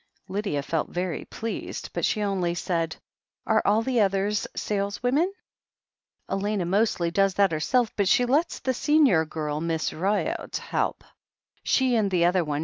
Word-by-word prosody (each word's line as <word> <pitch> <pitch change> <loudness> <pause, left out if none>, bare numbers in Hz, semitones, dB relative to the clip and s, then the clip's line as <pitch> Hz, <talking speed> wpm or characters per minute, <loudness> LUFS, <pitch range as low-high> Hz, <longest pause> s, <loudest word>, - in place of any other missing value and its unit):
Lydia 195 -8 -2
felt 160 +1 -2
very 180 -2 -3
pleased, 225 0 -5
but - - -3
she 215 - +1
only 185 -4 0
said: 165 -2 -1 0.5
"Are 220 0 +3
all 215 +3 +3
the 250 -1 +1
others 200 +1 +1
saleswomen?" 245 - 0 1.0
"Elena 200 -1 -1
mostly 180 -2 +1
does 195 +1 +2
that 200 -2 +3
herself, 220 +10 +1
but 200 -2 +1
she 245 +6 +4
lets 290 +7 +1
the 260 - -1
senior 270 - +3
girl. 150 -1 -3
Miss 165 -1 -1
Ryott, 195 +5 -1
help. - - -2 0.6
She 260 -2 +2
and 215 -3 +2
the 175 -2 +2
other 180 0 +3
one. 145 -2 -2
195 Hz, 150 wpm, -26 LUFS, 170-220 Hz, 1.0 s, she